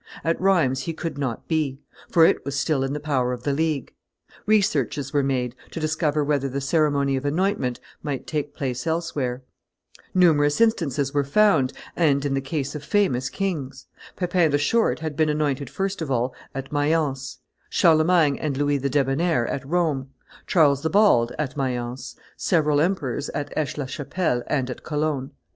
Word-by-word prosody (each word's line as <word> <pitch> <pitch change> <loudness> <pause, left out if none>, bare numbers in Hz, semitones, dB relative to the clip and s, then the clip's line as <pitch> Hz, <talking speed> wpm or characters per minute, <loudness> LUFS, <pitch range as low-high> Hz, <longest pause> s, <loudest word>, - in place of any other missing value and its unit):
At 165 +2 0
Rheims 160 -9 +2
he 165 - -2
could 160 -3 -5
not 125 -5 -3
be; 150 -5 -1 0.3
for 165 -1 +6
it - - +2
was 140 +1 -3
still 145 -5 +1
in 135 +1 -2
the 150 - -3
power 130 -4 0
of 125 -1 -7
the 145 - 0
League. 155 -2 -1 0.5
Researches 150 - +1
were 145 - +3
made, 130 -3 -1 0.2
to - - -6
discover 155 -1 0
whether 140 -2 0
the 135 +2 -3
ceremony 140 -1 +1
of 130 - -4
anointment 150 - 0 0.2
might 145 -3 -4
take 150 -2 -3
place 130 +1 -3
elsewhere; 145 -6 -2 0.7
numerous 150 -5 +4
instances 155 - +1
were 145 -1 +2
found, 150 -4 +3 0.2
and 145 -4 +2
in 140 - 0
the 135 - 0
case 140 0 -3
of 150 -2 -6
famous 135 -9 +1
kings: 165 -9 -4 0.3
Pepin 180 -2 +2
the 145 - +2
Short 160 +5 +1
had 155 -2 -4
been 155 0 +2
anointed 145 -3 -1
first 195 -1 -3
of 160 - -3
all 125 0 0 0.2
at 135 0 -5
Mayence, 145 -4 0 0.3
Charlemagne 160 -3 +4
and 145 -3 -2
Louis 145 0 +1
the 140 +1 -1
Debonnair 140 +1 +1
at 140 - -3
Rome, 145 -3 0 0.4
Charles 145 -5 +4
the 160 - 0
Bald 195 - +4
at 150 -4 -3
Mayence, 125 -2 -3 0.2
several 150 -4 +2
emperors 150 -6 -1
at 145 -1 -4
Aix 155 -1 -2
la 145 - -2
Chapelle 145 0 -2
and 130 -3 -1
at - - -8
Cologne. 150 -3 -2
145 Hz, 170 wpm, -24 LUFS, 135-160 Hz, 0.7 s, for